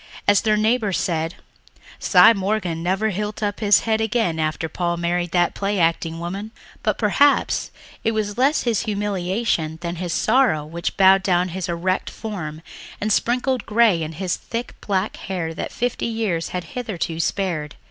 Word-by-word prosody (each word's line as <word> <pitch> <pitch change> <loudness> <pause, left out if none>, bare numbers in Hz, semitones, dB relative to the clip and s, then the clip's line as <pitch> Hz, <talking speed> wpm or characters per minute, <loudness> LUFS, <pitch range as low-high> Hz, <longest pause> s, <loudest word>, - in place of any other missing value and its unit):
As 205 -1 +5
their 215 -2 +2
neighbours 215 -2 +1
said, 165 -1 -1 0.6
"Cy 230 - +7
Morgan 190 -5 -1
never 190 +5 0
hilt 210 +2 -4
up 205 0 -1
his 205 -3 +5
head 220 -1 0
again 220 -7 0
after 155 0 -1
Paul 170 +1 -2
married 175 +1 -1
the 175 0 +2
play 200 0 -1
acting 165 0 0
woman." 195 +5 -5 0.3
But - - 0
perhaps 285 0 +2 0.3
it 225 - +2
was 210 -1 -2
less 275 +5 +2
his 230 -4 +1
humiliation 200 -5 -1
than 170 0 -4
his 175 0 -3
sorrow 220 - +2
which 170 +2 -4
bowed 195 0 +6
down 180 -1 +1
his 185 +1 -4
erect 180 +2 -1
form 165 -8 -6 0.4
and 215 0 +1
sprinkled 250 +3 0
grey 215 -6 +4
in 160 0 -4
his 180 +2 -2
thick 235 +1 -5
black 195 0 -1
hair 175 -4 -4
that - - -5
fifty 245 0 -2
years 220 -8 -1
had 180 -1 -3
hitherto 195 -9 -3
spared. 165 -5 -1
190 Hz, 165 wpm, -22 LUFS, 170-220 Hz, 0.6 s, Cy